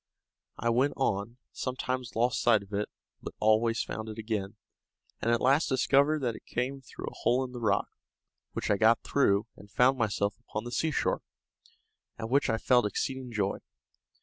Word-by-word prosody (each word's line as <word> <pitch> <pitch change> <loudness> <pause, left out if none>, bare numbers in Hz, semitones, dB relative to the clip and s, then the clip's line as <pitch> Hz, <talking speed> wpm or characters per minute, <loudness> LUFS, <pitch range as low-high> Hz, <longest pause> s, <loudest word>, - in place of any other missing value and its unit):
I 120 - 0
went 130 +5 +2
on, 115 -2 -1
sometimes 130 -1 -3
lost 120 +2 +1
sight 110 -4 +4
of 100 +1 -16
it, 105 +1 -1 0.3
but - - -8
always 110 +2 +3
found 110 0 -5
it 110 - -7
again, 105 -2 -3 0.7
and 115 - 0
at 120 0 +3
last 140 +5 +3
discovered 140 +3 +3
that 120 -3 0
it - - -13
came 135 +3 -2
through 130 - -9
a - - -6
hole 125 +2 +2
in 130 - -6
the 125 - -7
rock, 105 -3 +2 0.7
which - - -2
I 100 - +3
got 115 +2 +4
through, 105 -7 +2
and 100 - -15
found 130 +5 +3
myself 100 -2 0
upon 105 - -5
the 120 - -6
seashore, 160 +3 0 1.0
at 115 +1 -5
which 140 +2 +3
I 115 - +2
felt 120 -1 +3
exceeding 130 +3 -3
joy. 100 -3 -1
115 Hz, 175 wpm, -29 LUFS, 110-130 Hz, 1.0 s, sight